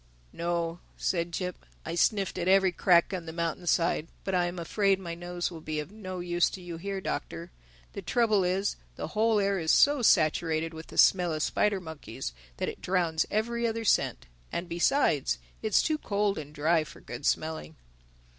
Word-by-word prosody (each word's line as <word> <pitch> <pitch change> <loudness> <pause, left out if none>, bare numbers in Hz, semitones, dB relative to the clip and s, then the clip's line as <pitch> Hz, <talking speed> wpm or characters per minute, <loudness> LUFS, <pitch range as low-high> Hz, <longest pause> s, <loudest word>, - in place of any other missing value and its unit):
"No," 170 0 -2 0.2
said 170 -1 -1
Jip. 180 +1 -4 0.2
"I 165 - -3
sniffed 195 +1 +1
at 175 - -2
every 190 0 +5
crack 175 +1 +3
on 175 -3 -4
the - - -4
mountainside. 170 0 0 0.2
But 190 - -3
I 180 -1 +3
am 175 +1 -5
afraid 195 +3 +1
my 170 -3 -5
nose 175 +1 -4
will 165 -2 -8
be 155 0 -3
of 150 +5 -6
no 185 -4 -6
use 175 0 +2
to - - -8
you 175 -2 -7
here, 195 +2 -4
Doctor. - - -4 0.4
The - - -5
trouble 215 -5 +2
is, 190 +3 0 0.2
the - - -5
whole 220 0 +2
air 200 -1 +1
is 160 -1 -2
so 285 -2 +5
saturated 160 -4 +2
with 160 +1 -9
the - - -11
smell 180 -3 +5
of 155 - -1
spider 205 -2 +1
monkeys 145 - -7 0.2
that - - -2
it - - -6
drowns 170 -4 +1
every 235 +2 0
other 225 0 -2
scent—And - - -1
besides, 170 - +2 0.2
it's 215 -2 +3
too 310 -1 0
cold 205 - 0
and 150 -1 -8
dry 155 +2 +2
for 155 - -12
good - - -8
smelling." 155 - -1
175 Hz, 185 wpm, -29 LUFS, 160-195 Hz, 0.4 s, every